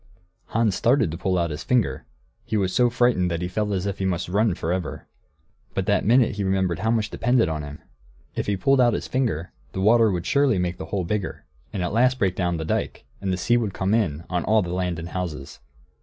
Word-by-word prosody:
Hans 115 -2 +1
started 120 - +2
to 80 - -5
pull 90 0 0
out 85 -2 0
his 75 +3 -5
finger; 120 +3 0 0.4
he 110 - -2
was 95 -2 0
so 125 -1 +4
frightened 120 -7 +2
that 85 0 -2
he - - -1
felt 105 +3 -2
as 95 -1 -1
if 100 -1 -3
he 95 - -1
must 90 -2 -1
run 105 0 +2
for 85 - -2
ever. 90 -1 -4 0.7
But 95 - 0
that 100 - +2
minute 120 -3 +4
he 100 - -1
remembered 95 -3 0
how 110 +4 0
much 110 -2 0
depended 120 0 +2
on 80 -1 -2
him; 75 +1 -9 0.5
if - - -2
he 100 -1 0
pulled 135 +6 +3
out 120 -2 +4
his - - -4
finger, 115 - -1 0.2
the - - -4
water 115 +2 +5
would 90 -3 -2
surely 140 -4 +3
make 90 0 -2
the - - -5
hole 95 -3 -2
bigger, 100 +2 -3 0.3
and 95 - -3
at 90 - -2
last 125 +3 +3
break 95 -6 +1
down 90 -2 0
the 80 - -4
dike, - - -2 0.2
and 95 -1 -1
the 90 - 0
sea 120 +6 +2
would 110 -5 -2
come 95 +2 0
in 85 -9 0
on 90 -2 -1
all 110 -1 +3
the 90 0 -4
land 90 -2 -1
and 85 +1 -6
houses. 80 -8 -5
95 Hz, 240 wpm, -24 LUFS, 90-115 Hz, 0.7 s, water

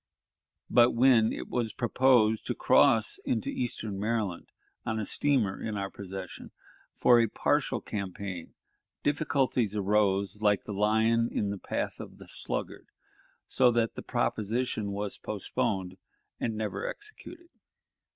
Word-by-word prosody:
but, 120 0 +5
when 120 -2 +5
it - - -5
was 120 -3 -2
proposed 120 -3 +3
to - - -1
cross 110 -1 +3
into 110 -4 -1
eastern 110 -5 -3
Maryland 105 -4 -2 0.4
on 110 0 -2
a 110 - -2
steamer 120 -6 +1
in 110 -2 -3
our 100 -1 -3
possession 95 -1 -8 0.5
for 120 -1 +5
a 115 - +3
partial - - 0
campaign, 95 -3 -6 0.5
difficulties 135 -7 +1
arose 100 0 +1
like 105 -2 +3
the 105 - -6
lion 110 +3 +2
in 100 -1 -1
the 100 - -5
path - - -3
of - - -9
the - - -13
sluggard, - - -5 0.6
so 130 -1 +3
that 115 -1 +1
the - - -7
proposition 110 -1 -1
was 100 0 -4
postponed 95 -1 -2 0.4
and 115 - -2
never 110 -1 -3
executed. 350 -5 -9
110 Hz, 130 wpm, -29 LUFS, 100-120 Hz, 0.6 s, but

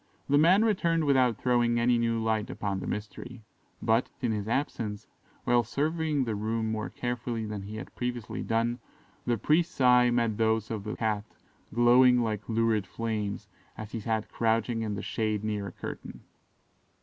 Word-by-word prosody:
The 145 +1 +4
man 185 +8 +5
returned 170 -6 +2
without 130 -5 +3
throwing 120 -1 +2
any 120 0 +3
new 115 -1 +1
light 110 -1 0
upon 100 -2 -3
the - - -6
mystery; 110 +3 -6 0.4
but, 115 +2 +2
in 120 -3 0
his 105 -1 -3
absence, 115 -4 -2 0.4
while 120 0 +3
surveying 155 +1 0
the 115 -3 -2
room 110 +1 -1
more 110 -1 -3
carefully 120 -2 -3
than 105 -2 -5
he 100 +2 -8
had 110 - -8
previously 125 -2 -4
done, 115 +2 0 0.5
the 120 -1 +2
priest's 160 - +1
eye 125 -1 +6
met 115 -3 +1
those 110 -1 +1
of 110 -2 -4
the 105 - -3
Cat 105 -2 -1 0.5
glowing 125 +2 +5
like 110 -1 -3
lurid 110 -3 +1
flames, 105 -3 -3 0.3
as 110 0 -7
he 115 - -4
sat 110 0 -2
crouching 115 0 0
in 105 -2 -2
the 100 - -5
shade 110 -2 -1
near 105 -2 -2
a - - -7
curtain. - - -8
115 Hz, 170 wpm, -28 LUFS, 110-125 Hz, 0.5 s, eye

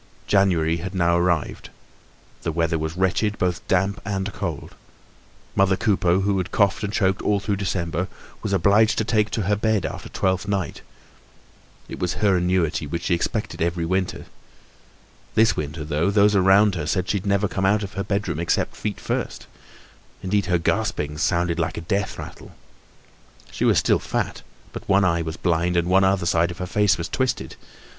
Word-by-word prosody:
January 85 -5 +2
had 95 +3 -6
now 85 -1 +2
arrived; 85 -3 0 0.7
the 85 - -2
weather 80 0 0
was 80 +2 -4
wretched, 100 +3 +1
both 90 -1 -1
damp 95 +2 +1
and 100 0 -3
cold. 90 -6 -5 0.8
Mother 95 -1 +3
Coupeau, 95 -4 +2
who 100 0 +1
had 90 - -4
coughed 100 0 +2
and 100 - -2
choked 95 -2 +1
all 105 -1 +1
through 100 0 -2
December, 85 -2 -2 0.3
was 105 - -3
obliged 100 +4 +3
to - - +2
take 110 -1 +1
to 105 - -2
her 105 +3 +1
bed 105 -2 0
after - - -6
Twelfth 95 +1 -1
night. 95 -7 -2 1.1
It - - -8
was 90 - -1
her 100 -3 +2
annuity, 90 -4 0
which 85 +3 -4
she 90 - +1
expected 85 - -2
every 85 0 0
winter. 95 +2 -2 1.1
This 110 +1 +4
winter 75 +2 -4
though, 75 +4 0
those 105 0 +4
around 100 +2 +5
her 85 -4 -3
said 90 +1 0
she'd 100 0 -1
never 100 +1 +2
come 95 0 -1
out 105 +1 +2
of 100 - -6
her 100 - -3
bedroom 100 -6 -2
except 85 - 0
feet 105 -2 -4
first. - - -3 0.8
Indeed, 100 +1 0
her 90 - +2
gaspings 85 -5 -1
sounded 85 0 +1
like 80 0 -1
a - - -3
death 100 +3 -2
rattle. - - -10 1.0
She - - -1
was - - +4
still - - +3
fat, - - -3 0.3
but - - -8
one 100 0 +4
eye 85 -1 +2
was 80 0 -5
blind 85 0 +1
and 85 0 +1
one 95 +1 +4
side 85 0 +2
of 85 - -7
her 90 - -4
face 105 +2 +2
was 85 - -4
twisted. 130 -2 -2
95 Hz, 180 wpm, -23 LUFS, 85-100 Hz, 1.1 s, around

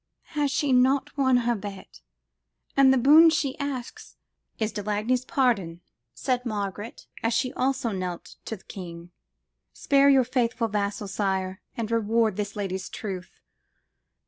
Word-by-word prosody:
Has 295 -2 +1
she 275 -1 +1
not 265 +3 +3
won 260 -3 +3
her 240 - +3
bet? 200 - -8 0.7
And 275 -1 +6
the 265 - +4
boon 300 +6 +7
she 295 -5 0
asks 280 - -6 0.4
""Is 220 -1 -1
de 210 0 -4
Lagny's 215 +5 0
pardon," 220 - 0 0.3
said 250 - -1
Margaret, 210 -1 -5 0.2
as 230 0 +1
she 255 +2 0
also 260 -3 0
knelt 185 -3 -5
to 225 - -4
the 190 - -23
king: 170 -2 -9 0.6
"spare 280 0 +4
your 270 -2 +6
faithful 235 -2 0
vassal, 205 0 -2
sire, 190 -1 -2 0.2
and 230 -1 -3
reward 225 -1 +2
this 205 0 -4
lady's 190 -2 -4
truth." 185 -4 -6
230 Hz, 145 wpm, -26 LUFS, 200-265 Hz, 0.7 s, boon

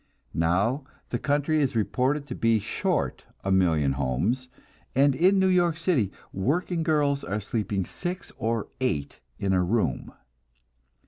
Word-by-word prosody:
Now 95 - +1 0.3
the 120 - -2
country 145 +2 +1
is 135 -4 0
reported 130 +6 +1
to - - -6
be 115 -1 +2
short 105 - -1 0.2
a 95 - -1
million 80 -7 +3
homes, 70 - -1 0.5
and 140 +1 +5
in 185 +8 +4
New 190 - +4
York 175 -3 +3
City 155 - +1 0.2
working 165 - 0
girls 145 -3 +1
are 105 +3 -2
sleeping 100 -2 -2
six 180 - -5
or 115 -1 -1
eight 75 - -2 0.2
in 95 -1 0
a 90 - +3
room. 95 +1 0
120 Hz, 140 wpm, -26 LUFS, 95-150 Hz, 0.5 s, and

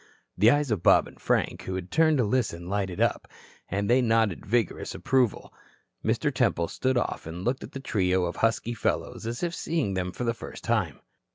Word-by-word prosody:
The 105 +5 +5
eyes 145 0 +2
of 105 -6 0
Bob - - +5
and - - -15
Frank, - - 0
who 95 - -3
had 95 0 -6
turned 160 -2 +4
to 125 - +3
listen, 105 -7 -1
lighted 95 -2 -2
up, - - +1 0.4
and 100 +2 -1
they 125 +2 +4
nodded 115 -6 +1
vigorous 115 -3 0
approval. 130 -5 0 0.5
Mr. - - 0
Temple 85 0 +1
stood 130 -1 0
off 120 - -2
and 85 +3 -6
looked 130 +2 -1
at - - -10
the 135 - -5
trio 95 -8 +1
of 85 - -4
husky 115 +1 +1
fellows 115 - -2
as 120 +7 -4
if 170 -1 -1
seeing 155 - -1
them 90 -1 -2
for 125 - -5
the 115 -1 +1
first 115 - -9
time. 105 - 0
110 Hz, 200 wpm, -27 LUFS, 95-125 Hz, 0.5 s, The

